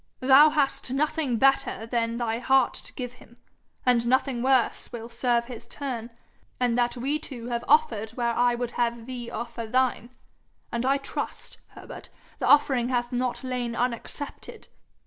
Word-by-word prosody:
'Thou 270 +4 +7
hast 290 -4 0
nothing 290 -2 0
better 270 -2 +2
than 230 0 -1
thy 230 -1 -1
heart 265 0 +3
to - - -5
give 250 -1 -6
him, 235 - -18 0.5
and 240 -2 +3
nothing 260 0 +1
worse 260 -1 +1
will 230 -2 -6
serve 235 0 0
his 240 -2 -9
turn; 245 -5 -5 0.5
and 245 -2 +2
that 245 0 +1
we 280 +5 -1
two 245 -6 -7
have 235 0 -2
offered 225 -7 +3
where 235 -1 +1
I 245 0 +2
would 240 0 -3
have 235 -1 -1
thee 245 -2 -6
offer 235 -1 -5
thine 250 0 +1 0.6
and 235 +2 -1
I 275 +1 +3
trust, 275 - -5 0.2
Herbert, - - -10 0.3
the - - -1
offering 265 -4 +4
hath 245 -1 -1
not 250 +1 -1
lain 250 -2 -3
unaccepted.' 245 +4 -4
245 Hz, 160 wpm, -26 LUFS, 235-265 Hz, 0.6 s, Thou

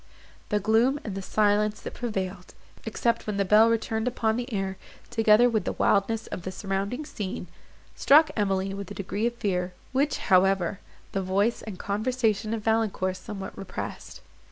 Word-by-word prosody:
The 210 - +2
gloom 225 +7 +3
and 210 - -5
the 195 - -4
silence 210 +1 +1
that - - -7
prevailed, 190 -6 -4 0.3
except 230 +1 0
when 210 -2 -2
the 200 - +1
bell 215 +4 +6
returned 225 0 0
upon 225 -3 0
the 245 +2 -4
air, 195 -2 -2 0.3
together 225 0 +5
with 220 -5 +1
the - - -2
wildness 220 +3 +1
of - - -6
the 185 - -5
surrounding 195 +8 -3
scene, 205 -9 -5 0.5
struck 305 +3 +5
Emily 195 -2 0
with 200 0 -6
a 205 - -7
degree 200 +3 -1
of 240 - -3
fear, 180 -5 -1 0.2
which, 280 +2 +1
however, 190 0 +2 0.3
the 195 - -1
voice 200 +5 +1
and 210 -4 -7
conversation 220 +1 0
of 220 - -6
Valancourt 220 -4 +1
somewhat 195 +1 -7
repressed. 195 - -7
210 Hz, 165 wpm, -27 LUFS, 195-225 Hz, 0.5 s, bell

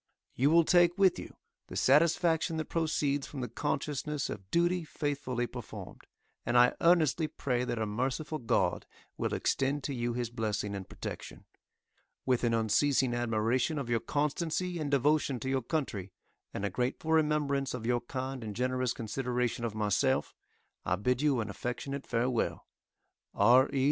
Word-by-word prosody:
You 135 +4 +2
will 170 +1 +6
take 175 +1 +4
with 195 -2 +4
you - - -9 0.3
the - - -9
satisfaction 160 +3 +3
that 155 - -2
proceeds 145 -4 0
from 140 - -6
the 125 - -2
consciousness 145 +3 -2
of 95 -2 -8
duty 175 - +2
faithfully 145 -6 -2
performed; - - -9 0.4
and 120 - +1
I 120 0 +6
earnestly 165 -2 +4
pray 125 -4 -2
that 120 - -2
a 110 - 0
merciful 130 +8 -2
God 120 -1 0 0.3
will - - -2
extend 135 +1 0
to 140 - -3
you 120 -1 -2
His 120 -1 -3
blessing 105 -3 -2
and 95 -2 -6
protection. - - -7 0.8
With 125 -2 +1
an 120 - +2
unceasing 125 +3 +2
admiration 120 +5 0
of 130 -4 -3
your 115 - +3
constancy 165 +6 -1
and 150 -2 -2
devotion 140 -1 +2
to 130 - -3
your 135 0 +1
country, 105 - -3 0.4
and 100 - -3
a 100 - -2
grateful 125 - -2
remembrance 150 -4 +1
of 115 -3 -6
your 120 0 +1
kind 130 +1 -5
and 105 -2 -6
generous 125 0 0
consideration 125 +1 -2
of 110 -2 -4
myself, 110 +5 +1 0.5
I 95 - +1
bid 125 +7 0
you 140 -5 +2
an 110 - -4
affectionate 135 +5 -5
farewell. 120 0 -1 0.7
R. 125 +6 +5
E. 135 - -1
130 Hz, 160 wpm, -31 LUFS, 120-150 Hz, 0.8 s, will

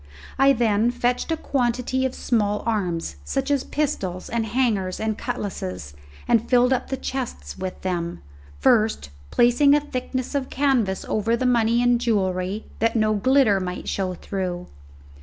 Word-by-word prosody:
I 275 +1 +6
then 225 -2 +2
fetched 245 +4 -1
a 325 - +1
quantity 255 -2 0
of 260 - -8
small 210 -3 0
arms, 180 - -2
such 270 - -2
as 280 -2 +2
pistols 195 -12 -2
and 230 -1 -1
hangers 210 -7 0
and 220 0 -1
cutlasses, 90 - -5 0.3
and 230 -1 +2
filled 250 +1 +4
up 255 - -1
the 265 - -2
chests 245 - -5
with 185 -1 -5
them, 175 - -3 0.3
first 215 - +2 0.2
placing 245 +4 +4
a - - +4
thickness 255 -2 -4
of 275 -2 -2
canvas 250 -9 +1
over 225 +2 +1
the 255 - -1
money 235 -1 +3
and 245 -1 +3
jewellery, 190 -2 0
that 230 +1 +1
no 215 -1 +2
glitter 235 -1 +3
might 180 -1 -5
show 185 -2 -2
through. 180 -2 -4
230 Hz, 155 wpm, -23 LUFS, 190-255 Hz, 0.3 s, I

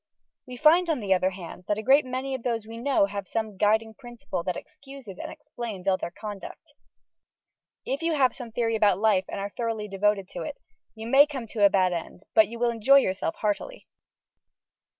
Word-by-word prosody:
We 250 -1 -8
find, 335 +5 +5
on 310 -5 +1
the 200 -4 +2
other 185 0 +2
hand, 180 -1 -10
that 210 - 0
a 215 - -4
great 275 +4 +5
many 260 +1 -3
of 260 - -4
those 230 -2 -2
we 225 +1 -9
know 260 -4 +3
have 200 -1 -6
some 220 0 -3
Guiding 220 +3 +2
Principle 240 -7 -6
that 180 0 -3
excuses 270 -8 -11
and - - -6
explains 235 -10 -8
all 190 - +4
their 175 - -4
conduct. 210 - -9 1.1
If 275 +4 -2
you 330 -1 0
have 260 -3 +3
some 245 -4 -7
Theory 230 0 0
about 205 -4 +3
Life, 200 -3 +2
and - - -4
are 200 - -2
thoroughly 225 -1 -3
devoted 200 0 0
to - - -7
it, - - -6 0.4
you 220 0 -8
may 275 +5 +6
come 270 -5 -5
to 210 -2 -1
a - - +7
bad 185 -2 +2
end, 170 +1 -6
but 220 -2 +6
you 235 +3 -8
will 240 0 +1
enjoy 235 +5 +5
yourself 185 -9 0
heartily. 215 - -3
220 Hz, 205 wpm, -26 LUFS, 200-260 Hz, 1.1 s, a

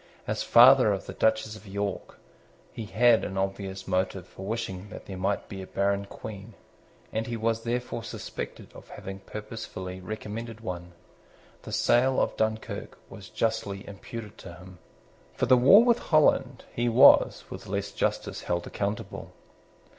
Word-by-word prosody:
As - - -2
father - - +7
of - - -2
the - - -7
Duchess 110 0 +1
of 110 -1 -13
York, 100 +1 -4 0.6
he 110 - -6
had 120 +2 +4
an 95 - -4
obvious 95 0 -3
motive 95 -1 -1
for 95 - -9
wishing 105 -3 -4
that - - -10
there 95 - -7
might 95 +2 -1
be 95 -1 -7
a 95 - -8
barren 100 0 0
Queen; 105 +1 -9 0.6
and 110 +1 -2
he 115 0 -3
was 115 0 0
therefore 120 0 -3
suspected 110 - -7
of - - -14
having 95 0 -8
purposely 95 -3 -7
recommended 110 +3 -6
one. 90 -4 -6 0.7
The - - -9
sale 130 +2 +3
of - - 0
Dunkirk 110 0 -3
was 100 - -10
justly 110 -3 -2
imputed 105 +2 -9
to - - -10
him. 90 0 -13 0.6
For - - +1
the 130 - +6
war 140 - +8
with 240 -1 +3
Holland, 155 -2 +2
he 120 0 0
was, 120 +3 +6
with - - -8
less - - -3
justice, - - -2
held 85 0 -2
accountable. 100 +1 -4
105 Hz, 155 wpm, -27 LUFS, 95-115 Hz, 0.7 s, war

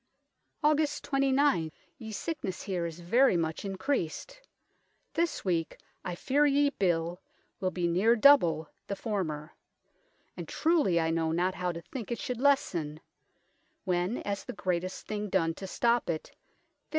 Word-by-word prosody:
" - - -45
Aug. 300 0 +2
29. 270 - +2 0.3
Ye 220 -1 -7
sicknes 215 - -4
here 180 -4 -2
is 165 +1 -9
very 230 +4 +4
much 160 -1 -2
in 195 -1 -4
creased: 280 - -2 0.7
this 335 -7 -1
weeke 170 -3 0 0.3
I 180 - -4
feare 285 +9 +2
ye 285 0 +3
bill 175 - 0 0.4
wilbee 185 -2 0
neere 195 +8 +4
double 175 - +5 0.2
the 200 - -2
former; 170 -8 -3 0.8
and - - -7
truely 310 - +2
I 160 0 +1
know 165 -1 0
not 180 +3 +1
how 180 -1 -2
to 170 0 -8
thinke 235 +2 -7
it 235 - -2
should 250 -3 -4
lessen, 170 - +1 0.8
when 180 +4 0
as 200 -1 -3
the - - -6
greatest 185 -1 -2
thing 210 -1 -3
done 165 -4 +1
to 190 +4 -8
stop 235 +3 +1
it, 160 -2 -3
vizt. - - -39
190 Hz, 150 wpm, -30 LUFS, 170-265 Hz, 0.8 s, double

